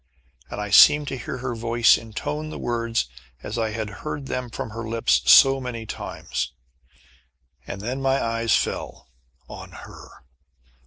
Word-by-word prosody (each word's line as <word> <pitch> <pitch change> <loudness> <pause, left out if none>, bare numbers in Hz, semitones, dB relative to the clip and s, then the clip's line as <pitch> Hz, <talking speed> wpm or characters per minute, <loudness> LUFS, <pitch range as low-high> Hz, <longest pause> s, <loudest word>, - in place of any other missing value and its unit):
And - - -6
I 105 -1 -4
seemed 150 +7 +7
to - - -4
hear 125 0 -6
her 125 0 -4
voice 115 0 +4
intone 150 +7 -5
the - - -7
words 115 - -1 0.4
as - - -4
I 110 -1 0
had 110 0 -4
heard 150 -2 -5
them 125 -2 -4
from 115 - -6
her 115 +2 -6
lips 70 - +2
so 135 0 +7
many 120 -3 -5
times. - - -5 1.1
And 95 - -6
then 125 +5 -4
my 135 0 +2
eyes 115 0 +1
fell 65 - -3 0.4
on - - -10 0.2
her! - - -14
115 Hz, 155 wpm, -23 LUFS, 110-130 Hz, 1.1 s, seemed